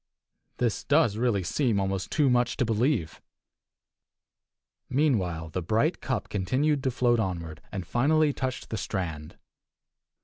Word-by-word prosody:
This 120 -3 0
does 145 -8 +3
really 110 -4 +1
seem 115 - +1
almost 95 -1 -2
too 150 -2 +2
much 120 -1 +2
to 130 - +1
believe. 115 - 0 1.7
Meanwhile 95 - 0
the 90 +3 -3
bright 110 - +1
cup 115 -6 -2
continued 130 +9 0
to - - +3
float 120 -1 +2
onward, 85 -6 -3
and 95 -3 -4
finally 145 - +2
touched 130 0 -4
the 110 - -2
strand. 80 -7 -4
115 Hz, 130 wpm, -27 LUFS, 95-130 Hz, 1.7 s, does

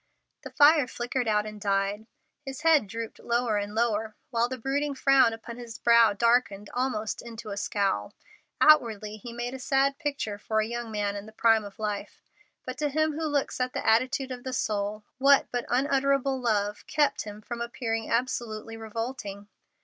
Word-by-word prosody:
The - - -8
fire 290 -2 +5
flickered 245 0 -3
out 210 -1 +2
and 210 -1 -8
died, 200 +2 0 0.4
his 270 0 -7
head 310 -8 +4
drooped 230 +2 -6
lower 235 -2 0
and 205 +1 -5
lower, 220 -2 0 0.2
while 235 0 +1
the 260 - -4
brooding 280 +4 -1
frown 270 -3 +5
upon 230 +1 -8
his 235 -2 -8
brow 235 -2 +5
darkened 220 -2 +1
almost 245 -4 -2
into 230 -2 -8
a - - -3
scowl. 195 - -1 0.4
Outwardly 220 -8 +4
he 235 +3 -9
made 240 +1 -4
a 265 - -6
sad 275 +1 +1
picture 280 -10 -3
for 220 +1 -1
a 215 - +1
young 235 0 -5
man 205 -2 -2
in 205 +1 -7
the - - -11
prime 225 0 +3
of 200 -1 -10
life, 210 -2 -4 0.4
but 255 +1 -6
to 300 -1 +1
Him 310 +2 +1
who 315 +1 -2
looks 285 -3 -1
at 255 0 -1
the - - -4
attitude 260 +4 +2
of 250 -1 -6
the 260 - -4
soul, 210 -2 -2 0.2
what 275 +1 +5
but 245 -1 -2
unutterable 275 +1 +1
love 210 -3 0
kept 300 -2 +1
him 210 0 -8
from 235 +2 -6
appearing 225 -2 -3
absolutely 230 -2 -2
revolting? 220 -2 -6
235 Hz, 180 wpm, -27 LUFS, 215-265 Hz, 0.4 s, fire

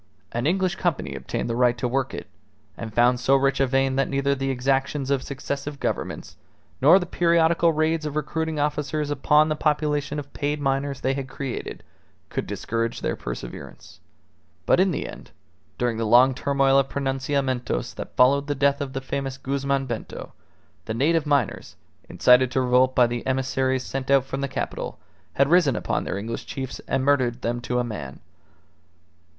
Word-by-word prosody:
An 120 +4 -1
English 185 +2 +1
company 160 - -1
obtained 65 - -4
the 115 - -2
right 120 0 +3
to 120 - -1
work 130 +1 -1
it, - - -6 0.5
and 110 -1 -7
found 120 +3 +3
so 135 +2 +3
rich 135 0 +2
a 135 - +3
vein 135 0 +1
that 135 - +1
neither 140 0 +1
the 135 0 -2
exactions 135 +2 0
of 140 -2 +2
successive 140 +1 -5
governments, - - -4 0.4
nor 155 +8 +8
the 185 - -1
periodical 170 -1 +3
raids 155 +1 0
of 150 -1 -4
recruiting 160 +1 -2
officers 150 0 -1
upon 150 +2 +4
the 155 - 0
population 150 -1 0
of 140 -1 -7
paid 145 +1 -2
miners 135 0 -1
they 135 - +1
had 135 -1 -4
created, 135 -1 -5 0.5
could - - -3
discourage 115 0 -3
their - - -1
perseverance. - - -8 0.7
But - - +4
in 190 +1 +4
the 170 - -3
end, - - -11 0.5
during 120 -2 0
the 115 - -1
long 125 +4 +6
turmoil 135 0 +2
of 135 0 0
pronunciamentos 135 - -1
that - - -8
followed 140 +3 +4
the 145 - -1
death 140 +1 +2
of 135 -2 -4
the 135 - -3
famous 135 0 -4
Guzman 140 0 -1
Bento, 120 -4 -6 0.5
the 110 - -3
native 155 +5 +2
miners, 140 -6 0 0.3
incited 125 0 +5
to 130 - +2
revolt 125 +1 +3
by 125 - +6
the 120 +1 -3
emissaries 130 0 0
sent 135 0 -5
out 135 -1 +4
from 135 0 -4
the 140 - -1
capital, 130 - -4 0.4
had 140 - +3
risen 165 -5 +4
upon - - -2
their - - -3
English 115 +3 -5
chiefs 130 -1 -5
and 135 0 0
murdered 130 -4 +1
them 120 +1 -1
to 125 0 -2
a 125 - +2
man. 75 - -6
135 Hz, 180 wpm, -24 LUFS, 125-145 Hz, 0.7 s, nor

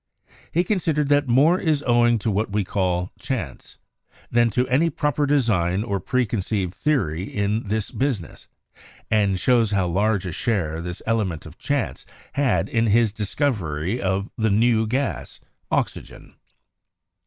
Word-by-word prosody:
He 175 - +2
consid 180 -5 0
ered 150 -1 0
that 145 -1 +3
"More 145 +9 +4
is 155 -4 0
owing 120 -1 +4
to 110 - +2
what 105 +1 -1
we 105 0 +1
call 90 -2 -1
chance... - - -5 0.5
than 120 0 +4
to 125 +3 0
any 140 +7 +3
proper 150 -2 0
design 105 -9 +2
or 100 -4 -2
preconceived 100 -4 -1
theory 95 - 0
in 105 +3 -1
this 105 0 -2
business," 125 -10 -3 0.6
and 100 -3 +2
shows 120 -2 +3
how 100 -3 +1
large 100 +3 +1
a 90 - -3
share 85 -5 -1
this 90 +1 -6
element 100 -9 -1
of 80 +1 -12
chance 140 -4 -2 0.3
had 140 -2 +1
in 115 -4 +1
his 110 0 +3
discovery 105 - -1
of 95 +1 -1
the 110 -2 +1
new 110 +2 +3
gas, 130 +4 -2 0.3
oxygen. - - -3
110 Hz, 145 wpm, -23 LUFS, 95-130 Hz, 0.6 s, More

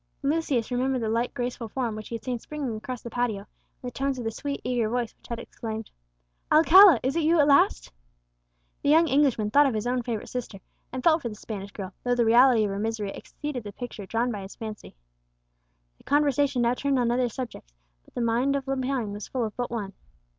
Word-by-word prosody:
Lucius 275 -5 0
remembered 255 0 0
the - - -1
light 235 +2 0
graceful 245 -1 -3
form 240 -2 -2
which 215 0 -8
he 235 - -4
had 230 - -7
seen 250 -2 -3
springing 280 -4 -5
across 245 +3 -6
the 235 - -6
patio, 240 -4 -1
and - - -40 0.4
the 250 - -4
tones 270 +2 -2
of 245 - -4
the 225 - -1
sweet 280 +5 -4
eager 240 -3 0
voice 240 -1 -2
which - - -19
had 235 - -4
exclaimed, 225 -1 -7 0.6
"Alcala, 330 - +8
is 265 +3 0
it 335 - +2
you 325 +2 +3
at 290 - +6
last?" 280 - +3 0.9
The 285 - 0
young 325 +2 +6
Englishman 265 -7 +2
thought 290 +3 +6
of 255 - -1
his 215 - -2
own 250 0 0
favourite 230 -3 -4
sister, 245 -5 -5 0.3
and 255 0 -5
felt 330 -1 +4
for 240 - -3
the 210 - -8
Spanish 200 -2 -7
girl, 195 -2 -7
though 245 0 +1
the 240 -1 +2
reality 240 0 +6
of 205 - -1
her 195 - -3
misery 215 -2 -2
exceeded 295 0 -6
the 205 - -7
picture 225 -5 -7
drawn 235 +3 0
by 205 -3 -5
his 195 +1 -9
fancy. 215 - -8 1.0
The - - -21
conversation 285 -3 +2
now 235 +1 +3
turned 275 +1 0
on 240 -2 +2
other 245 0 +1
subjects, 230 - -7 0.3
but - - -25
the 245 - -2
mind 240 +4 +1
of 275 -1 -3
Lepine 260 -4 -1
was 205 0 -7
full 255 -2 -2
of 215 - -6
but 245 -1 -3
one. 205 -4 -4
245 Hz, 225 wpm, -26 LUFS, 225-270 Hz, 1.0 s, Alcala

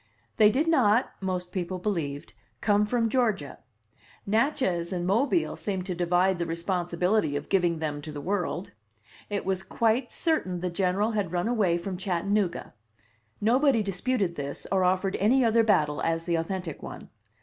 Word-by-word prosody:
They 210 -1 +7
did 280 +9 +1
not 250 -7 +3
(most 180 -2 -3
people 185 0 -3
believed) 165 -7 -3 0.3
come 210 0 +2
from 230 0 +1
Georgia. 220 - 0 0.7
Natchez 210 - 0
and 175 -2 -2
Mobile 255 - +1
seemed 190 -3 -3
to 185 - -3
divide 175 +1 +1
the 170 - -1
responsibility 175 0 0
of 145 - -4
giving 175 -4 +2
them 150 -2 -3
to 155 - -7
the 150 - -6
world. 180 +2 -2 0.6
It 205 -1 -3
was 190 -1 0
quite 230 +5 0
certain 185 - 0
the 180 -1 -2
General 190 +4 +1
had 205 -6 -1
run 175 +2 -1
away 205 -8 +2
from 180 +2 -5
Chattanooga. 190 +1 -1 0.7
Nobody 245 +1 +3
disputed 200 0 -1
this, 140 -1 -5
or 190 -1 +2
offered 185 +1 +1
any 240 +5 +3
other 230 0 +4
battle 155 -9 +2
as 165 0 0
the 170 - -1
authentic 165 0 -3
one. - - -9
190 Hz, 160 wpm, -27 LUFS, 175-215 Hz, 0.7 s, They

